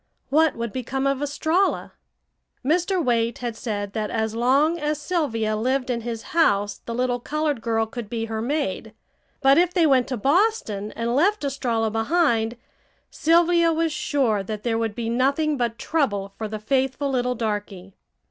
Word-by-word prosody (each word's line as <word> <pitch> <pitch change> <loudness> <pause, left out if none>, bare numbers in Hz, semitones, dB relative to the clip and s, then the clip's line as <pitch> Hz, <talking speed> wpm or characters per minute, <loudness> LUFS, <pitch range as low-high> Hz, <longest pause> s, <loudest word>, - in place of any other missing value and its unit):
What 315 +2 +3
would 230 -2 -4
become 265 +1 -2
of 275 0 0
Estralla? 315 +6 0 0.7
Mr. 350 +3 +1
Waite 235 -1 +1
had 240 -2 -4
said 205 -4 -4
that 215 -1 -2
as 220 -1 -1
long 275 +8 +2
as 300 0 -1
Sylvia 260 -11 -1
lived 255 +3 0
in 235 -1 -2
his 230 -1 -5
house 205 -11 +2
the 230 - -3
little 245 0 0
colored 295 -1 -2
girl 225 -1 0
could 220 -1 -7
be 225 -1 -2
her 220 -1 -4
maid. 285 +5 -2 0.5
But 275 +3 +6
if 355 +1 +2
they 340 -3 +4
went 265 -4 +3
to 255 - -3
Boston 270 - +1
and 235 +1 -2
left 390 +6 +2
Estralla 240 -5 -1
behind 230 -2 +1 0.5
Sylvia 335 +1 +3
was 325 -1 0
sure 255 -10 0
that 210 +2 -6
there 230 -2 0
would 225 -2 -2
be 235 -2 -3
nothing 275 +6 +1
but 235 -3 -1
trouble 205 -12 -1
for 220 - -4
the 215 0 -5
faithful 265 +5 0
little 250 -1 0
darky. 205 -4 -4
250 Hz, 165 wpm, -23 LUFS, 225-300 Hz, 0.7 s, But